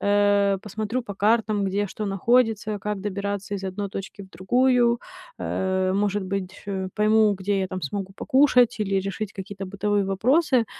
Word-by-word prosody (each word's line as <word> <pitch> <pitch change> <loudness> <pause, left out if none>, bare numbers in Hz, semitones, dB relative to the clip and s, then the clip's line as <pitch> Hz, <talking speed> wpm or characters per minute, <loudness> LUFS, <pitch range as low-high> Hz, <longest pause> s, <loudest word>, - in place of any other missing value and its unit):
э, 205 -1 +3
посмотрю 220 +4 -3
по 205 -4 -7
картам, 210 0 +2
где 200 +1 -1
что 210 +2 -5
находится, 215 +1 +1
как 210 0 -3
добираться 200 0 -3
из 195 -1 -5
одной 195 +2 -3
точки 195 +1 -7
в 190 - -14
другую, 240 +5 +2 0.4
э, 190 0 -1
может 205 0 0
быть, 190 0 -3
э, 190 -2 -3
пойму, 215 0 +4
где 195 +1 -1
я 190 - 0
там 185 0 -6
смогу 195 +6 -4
покушать 260 -3 +3
или 195 -2 0
решить 195 +2 -4
какие-то 195 0 -7
бытовые 200 +1 0
вопросы, 245 - +2
205 Hz, 160 wpm, -24 LUFS, 195-215 Hz, 0.4 s, пойму